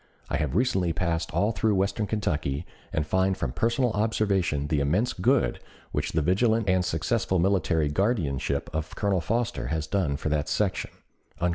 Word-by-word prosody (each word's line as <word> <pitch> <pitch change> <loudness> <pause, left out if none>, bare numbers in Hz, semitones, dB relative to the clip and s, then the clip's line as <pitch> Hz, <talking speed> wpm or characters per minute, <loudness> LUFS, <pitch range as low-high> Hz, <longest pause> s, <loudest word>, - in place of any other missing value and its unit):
I 75 - +1
have 75 -3 -2
recently 95 -7 +2
passed 85 -1 -1
all 105 +3 +2
through 110 -2 +1
western 100 +2 0
Kentucky 80 -8 -1 0.3
and 75 - 0
find 95 +3 +1
from 70 -8 -2
personal 120 - +1
observation 100 -8 +1
the 75 0 0
immense 90 - +1
good - - +2 0.3
which - - -2
the 80 - +1
vigilant 110 +6 +2
and 95 -1 +3
successful 90 +3 0
military 85 -4 +2
guardianship 75 - 0
of 80 0 -3
Colonel 100 -3 +1
Foster 115 +7 -1
has 80 -2 -1
done 80 -5 0
for 75 - -3
that 75 -1 0
section." - - 0
95 Hz, 160 wpm, -27 LUFS, 75-105 Hz, 0.3 s, and